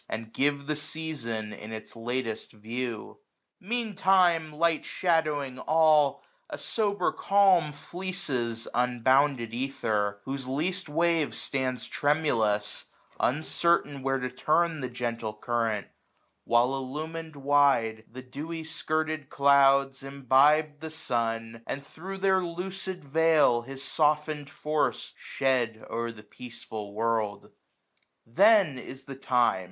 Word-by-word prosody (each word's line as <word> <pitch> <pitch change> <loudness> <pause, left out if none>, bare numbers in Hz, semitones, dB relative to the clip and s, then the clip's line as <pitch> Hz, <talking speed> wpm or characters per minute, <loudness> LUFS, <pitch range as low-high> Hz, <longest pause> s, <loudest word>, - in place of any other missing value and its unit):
And 110 0 -5
give 140 0 +1
the 150 +1 -1
season 145 -9 -4
in 105 +1 -9
its 110 +1 -8
latest 115 -1 -4
view. 115 +1 -5 0.4
M£AN 225 +1 -2
TiM£, 175 -5 +3
light 165 +1 +1
shadowing 150 -7 0
all, 155 -3 +3 0.3
a - - -5
sober 205 -3 0
calm 195 -4 +4
955 145 -1 -10
Fleeces 140 -11 -2
unbounded 125 0 +2
ether; 110 -5 -1
whose 135 -1 -4
least 165 +7 -2
wave 165 0 +1
Stands 130 -2 -2
tremulous, 115 -9 +1 0.3
uncertain 150 0 +1
where 135 0 0
to 125 -1 -4
turn 155 +4 +1
The 130 - -3
gentle 115 -3 -4
current: 115 -2 -1 0.6
while 120 +2 +3
illumin'd 155 +4 -5
wide. 135 -6 +2
The 130 +2 -9
dewy 160 +6 -6
skirted 155 -2 -2
clouds 140 -1 +4
imbibe 140 +3 +3
the 160 0 -6
sun. 115 -6 -2
And 140 +1 -4
thro* 190 +7 -8
their 190 -1 +3
lucid 185 +1 -5
veil 155 -4 +4
his 135 +2 -7
softened 150 -1 0
force 150 +1 -1
960 - - -33
Shed 125 -5 -1
o'er 115 0 -2
the 105 -2 -13
peaceful 110 -4 -8
world. 110 -2 -1 0.7
Then 190 - +4
is 130 +2 -9
the 135 - -8
time. 125 -6 +2
140 Hz, 120 wpm, -28 LUFS, 120-160 Hz, 0.7 s, calm